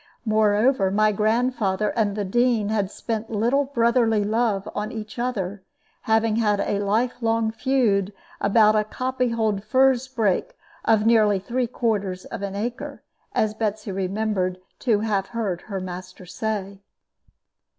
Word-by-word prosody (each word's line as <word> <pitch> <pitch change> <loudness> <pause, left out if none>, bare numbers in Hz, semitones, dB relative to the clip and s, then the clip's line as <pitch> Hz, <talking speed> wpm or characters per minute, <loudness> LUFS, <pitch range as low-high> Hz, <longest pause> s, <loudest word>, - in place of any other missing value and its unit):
Moreover, 215 0 +3
my 215 +2 +3
grandfather 215 -1 +1
and 210 -3 0
the 205 -1 -2
Dean 235 0 +2
had 205 -3 0
spent 225 +1 -4
little 235 +6 +1
brotherly 235 -4 +2
love 215 -2 0
on 210 +1 -3
each 220 +1 -7
other, 205 -6 -2 0.5
having 220 0 +3
had 210 -3 +2
a 200 0 0
life 225 +5 0
long 225 -1 +1
feud 220 -5 +1 0.3
about 215 +1 +4
a 215 - +3
copy 255 +3 -2
hold 220 -4 0
furze 260 +2 +3
brake 245 - -1 0.3
of 220 -1 +3
nearly 215 -3 +4
three 240 +6 -2
quarters 205 -6 -2
of - - -7
an 200 -1 -4
acre, 240 +5 -5 0.3
as 215 -1 +1
Betsy 215 -1 -3
remembered 190 -1 -1 0.2
to 220 -5 +1
have 200 -3 0
heard 205 -7 -3
her 195 -2 -3
master 185 0 -8
say. 200 +1 -4
215 Hz, 140 wpm, -23 LUFS, 200-235 Hz, 0.5 s, about